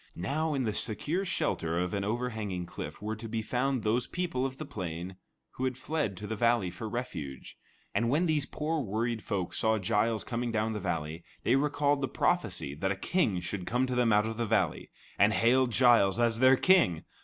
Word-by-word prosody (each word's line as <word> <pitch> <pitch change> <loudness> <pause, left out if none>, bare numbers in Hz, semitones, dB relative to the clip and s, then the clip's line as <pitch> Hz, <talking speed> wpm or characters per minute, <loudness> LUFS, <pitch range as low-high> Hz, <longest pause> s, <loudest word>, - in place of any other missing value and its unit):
Now, 150 - -1
in 135 - 0
the 110 -3 -1
secure 145 - -2
shelter 115 - -1
of 90 +1 -1
an 100 -1 -1
overhanging 110 -5 -2
cliff, 95 - -7
were 110 +1 -2
to 110 +1 -8
be 110 0 -2
found 125 +1 0
those 115 +3 +1
people 170 -8 -1
of 130 0 -9
the 155 - -5
plain 90 - -5 0.4
who 130 - -3
had 130 -1 -2
fled 140 - -2
to 105 - -7
the 110 - -3
valley 115 -5 +2
for 110 +3 -6
refuge; 75 - -5 0.4
and 115 +4 +1
when 155 +7 +2
these 155 -4 +1
poor 155 +1 -2
worried 115 0 -2
folk 95 -5 -3
saw 110 0 +2
Giles 105 +2 +1
coming 120 0 -2
down 110 0 0
the 105 - -3
valley, 80 -3 -3 0.2
they 120 - +3
recalled 145 0 +1
the 135 - 0
prophecy 70 - 0
that 95 +6 -1
a - - 0
king 105 - 0
should 95 -1 -5
come 125 +2 +1
to 130 - -3
them 125 -2 +3
out 105 0 +4
of 110 0 -4
the 115 -1 -1
valley, 115 +1 0 0.3
and 105 +3 +5
hailed 125 +3 +3
Giles 115 -4 +5
as 115 -1 +2
their 130 +1 +7
king. 125 - +4
115 Hz, 205 wpm, -30 LUFS, 100-130 Hz, 0.4 s, their